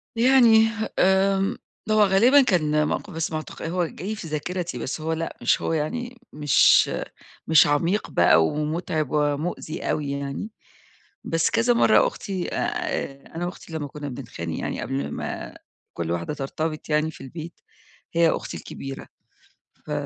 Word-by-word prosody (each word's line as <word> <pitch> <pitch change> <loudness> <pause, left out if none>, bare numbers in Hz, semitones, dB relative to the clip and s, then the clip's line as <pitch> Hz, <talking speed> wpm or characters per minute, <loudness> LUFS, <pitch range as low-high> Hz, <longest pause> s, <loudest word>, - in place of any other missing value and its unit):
يعني 230 -2 +6 0.3
آمم 195 +1 +3 0.3
هو 215 -1 +5
غالبًا 230 +9 +6
كان 155 - +2
موقِف 205 - -3
بس 165 +1 -2
معتق 155 0 -6
هو 175 +1 -1
جاي 195 +6 -5
في 185 -6 -8
ذاكرتي، 165 -1 -3
بس 130 +6 -4
هو 160 +1 -1
لأ، 165 0 -4
مش - - +2
هو - - -1
يعني 240 +11 -3 0.2
مش 145 -3 +5 0.6
مش 160 -2 +6
عميق 165 +8 +1
بقى 80 -1 +5
ومُتعِب 155 - -1
ومُؤذي 150 +2 -1
أوي 145 -2 -1
يعني. 140 +8 -4 0.7
بس 165 0 +1
كذا 235 +1 +3
مرّة 230 -2 +5
أختي 190 -4 -4
آآ 135 0 -3
أنا 175 +1 -2
وأختي 175 -2 -8
لمّا 150 -2 -3
كُنّا 145 0 -7
بنتخانق 115 - -6
يعني - - -3
قبل 70 +2 -3
ما - - -5 0.4
كل 85 0 -3
واحدة 85 - -2
ترتبط 155 +3 -4
يعني 155 +1 +1
في - - -14
البيت، 160 +5 -9 0.5
هي 170 -1 +4
أختي - - -3
الكبيرة، 135 0 -8 0.8
ف - - -8
160 Hz, 145 wpm, -24 LUFS, 145-190 Hz, 0.8 s, يعني